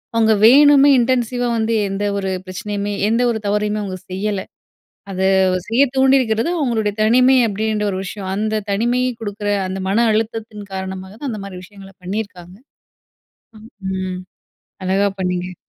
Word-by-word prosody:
அவங்க 220 -1 +4
வேணுமே 285 +3 +7
இன்டென்சிவா 245 0 0
வந்து 225 +1 0 0.2
எந்த 195 +1 -3
ஒரு 195 -1 -2 0.2
பிரச்சனையுமே 205 +2 -4 0.2
எந்த 230 +2 +2
ஒரு 220 - -3
தவறையுமே 210 +1 0
அவங்க 190 -2 -5
செய்யல. 200 +1 -2 0.7
அத 185 - -4 0.5
செய்யத் 260 +3 +2
தூண்டியிருக்கிறது 265 -1 +3
அவங்களுடைய 225 -8 0
தனிமை 255 +4 +5
அப்படின்ற 215 0 -1
ஒரு 185 - -3
விஷயம். 190 0 -6
அந்த 215 +1 -1
தனிமை 240 +5 +1 0.2
கொடுக்குற, 205 -1 -5 0.2
அந்த 190 +1 -4
மன 230 +5 +3
அழுத்தத்தின் 215 -1 -3
காரணமாக 190 0 -6
தான் 285 - -4
அந்த 215 -3 -6
மாதிரி 185 -2 -8
விஷயங்கள 195 0 -14
பண்ணியிருக்காங்க. 185 -2 -6 1.4
ம். 185 -1 -4 0.7
அழகா 195 +2 +2
பண்ணீங்க. 180 0 -2
210 Hz, 135 wpm, -19 LUFS, 195-230 Hz, 1.4 s, வேணுமே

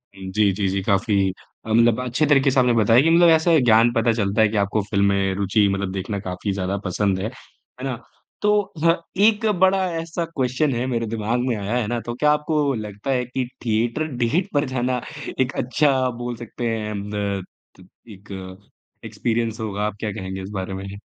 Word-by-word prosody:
जी, 95 +2 +1
जी, 100 +1 -1
जी, 95 +1 -1
काफ़ी 100 +1 +1 0.5
मतलब 115 +1 +4
अच्छे 125 +5 0
तरीके 140 -2 +4
से 130 - +2
आपने 125 -1 +4
बताया 115 +2 +5
कि 160 - +3
मतलब 170 +1 +6
ऐसे 160 0 +4
ज्ञान 115 -1 +5
पता 115 0 +2
चलता 105 -1 +1
है 110 - +6
कि 110 - -2
आपको 100 +1 +1
फ़िल्म 100 0 +1
में 100 -1 +1
रूचि 100 +1 +2
मतलब 100 -1 -2
देखना 100 +2 -3
काफ़ी 95 +1 -4
ज़्यादा 95 0 -2
पसंद 95 +1 0
है, 100 - -2
है 130 +1 -15
ना। 130 -2 -2 0.5
तो 210 0 +3 0.2
ह 165 - +6 0.3
एक 220 0 +3
बड़ा 190 +1 +4 0.2
ऐसा 165 +1 -3
क्वेस्चन 140 -2 0
है, 120 +2 -1
मेरे 115 -3 -1
दिमाग 110 +2 -1
में 125 - +1
आया 105 +2 -3
है 120 -4 0
ना, 120 +2 -1
तो 120 - -5
क्या 150 +4 +3
आपको 150 -1 +1
लगता 105 +2 -5
है 125 -2 0
कि 125 +1 -3 0.2
थिएटर 115 +6 0
डेट 125 +10 0
पर 145 0 +2
जाना 125 -1 -1 0.4
एक 130 0 +1
अच्छा, 140 +3 +2
आप 130 -2 0
बोल 120 0 -4
सकते 120 +1 -5
हैं 110 -2 -3 0.2
द 100 -2 -2 0.4
त 90 - -15 0.2
एक 100 0 -13 0.7
एक्सपीरियंस 115 -1 -2
होगा, 105 -2 -3
आप 105 -1 -3
क्या 105 0 -2
कहेंगे 95 -2 -6
इस 95 - -7
बारे 95 -1 -4
में? 95 +1 -6
115 Hz, 200 wpm, -22 LUFS, 100-130 Hz, 0.7 s, मतलब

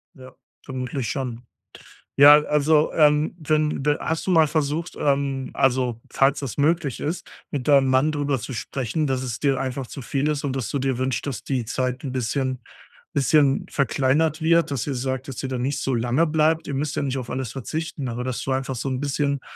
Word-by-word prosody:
Ja, 130 -2 -13 0.3
vermutlich 130 -2 -4
schon. 125 -3 -4 0.7
Ja, 145 +2 +9
also, 150 +1 +2
ähm, 150 +1 +3
wenn 155 -2 0
de 150 +1 +2
hast 160 +3 -3
du - - +2
mal 160 -3 +5
versucht, 155 +2 -2
ähm, 140 -2 0
also, 125 -3 +1
falls 135 +1 +3
das 135 -5 -5
möglich 150 -2 +1
ist, 165 +4 -4 0.2
mit 135 -4 -3
deinem 140 -2 +5
Mann 130 +4 +3
drüber 145 -3 -1
zu 125 - -6
sprechen, 135 +5 -2
dass 130 -1 -1
es 120 -3 -4
dir 140 -2 +1
einfach 130 -1 -3
zu 135 - -8
viel 135 +4 -1
ist 150 -2 -1
und 135 -2 -2
dass 130 -6 -3
du 140 - -1
dir 135 -1 0
wünschst, 130 0 -1
dass 140 -5 -4
die 130 -4 -2
Zeit 130 +2 -2
'n 135 - -4
bisschen 130 +1 -1 0.5
bisschen 140 -1 +3
verkleinert 140 +2 +1
wird, 165 -1 +3
dass 135 -2 -2
ihr 140 - -1
sagt, 130 +1 -3
dass 135 -5 -6
ihr 135 - -3
da 130 - -2
nicht 130 +3 -2
so 135 - -1
lange 120 +7 +2
bleibt? 160 +1 +1
Ihr 140 - -4
müsst 145 +2 -2
ja - - 0
nicht 135 -1 -2
auf 125 -2 -5
alles 130 -3 -3
verzichten, 145 +2 -4
aber 120 +1 -4
dass 130 -1 -3
du 135 - -3
einfach 135 0 -1
so 130 - -3
'n 130 0 -2
bisschen, 140 -1 -1
135 Hz, 210 wpm, -23 LUFS, 130-150 Hz, 0.7 s, Ja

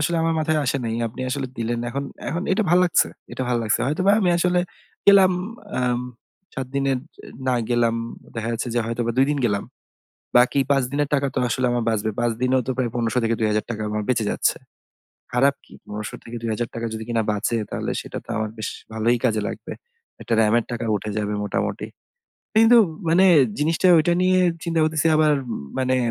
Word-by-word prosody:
আসলে 170 +3 0
আমার 165 0 +1
মাথায় 155 0 +1
আসে 135 - 0
নাই। 115 -1 -2
আপনি 115 - -10
আসলে 135 0 -2
দিলেন। 115 +1 -1
এখন, 140 +2 -3 0.2
এখন, 170 +2 -2
এটা 205 - +2
ভাল 175 - +6
লাগছে 175 - +3 0.2
এটা - - -3
ভাল 125 - +1
লাগছে 110 0 +1
হয়তোবা 185 +8 +2
আমি 185 -3 +3
আসলে 180 +1 +2 0.5
গেলাম 195 -2 +7 0.5
আম 125 -1 +1 0.5
৭ 135 -3 -3
দিনের 135 -1 +1 0.5
না 130 - +3 0.2
গেলাম। 120 -1 +2 0.4
দেখা 115 0 -3
যাচ্ছে 115 +2 -3
যে, - - +2
হয়তোবা 115 0 -1
২ 135 - +5
দিন 145 - -2
গেলাম। 100 -3 -1 0.7
বাকি 125 +3 +4
৫ 135 -1 +4
দিনের 145 0 0
টাকা 140 -1 +1
তো - - 0
আসলে 125 +2 0
আমার 120 -1 0
বাঁচবে। 110 -1 0
৫ 120 -1 +1
দিনেও 130 0 +3
তো - - -1
প্রায় 125 -2 0
১৫০০ 120 0 0
থেকে 115 0 +1
৳২০০০ 110 +1 -1
আমার 105 0 -2
বেঁচে 115 -4 +1
যাচ্ছে। - - +1 0.8
খারাপ 135 +3 +3
কি? - - -17
পণেরশো 105 0 -6
থেকে 115 - -9
৳২০০০ 115 +1 -3
যদি 110 0 -5
কিনা 115 -1 +1
বাঁচে 105 +3 -1
তাহলে - - -3
সেটা - - -7
তো - - -25
আমার 110 -1 -2
বেশ 110 - -3 0.2
ভালই 115 +2 +2
কাজে 110 -3 +1
লাগবে। - - -7 0.5
একটা - - -2
র‍্যামের 110 +1 +3
টাকা 120 -1 -3
উঠে 105 +1 -4
যাবে 105 0 -1
মোটামুটি। 105 - -2 0.7
কিন্তু 225 +2 +7 0.3
মানে 175 +4 +5 0.3
জিনিসটা 160 +4 +1
ঐটা 160 +2 +2
নিয়ে 185 0 +4 0.3
চিন্তা 165 -1 -1
করতেছি 155 0 +1
আবার 155 -1 +4 0.5
মানে 130 0 +1
125 Hz, 185 wpm, -23 LUFS, 115-150 Hz, 0.8 s, গেলাম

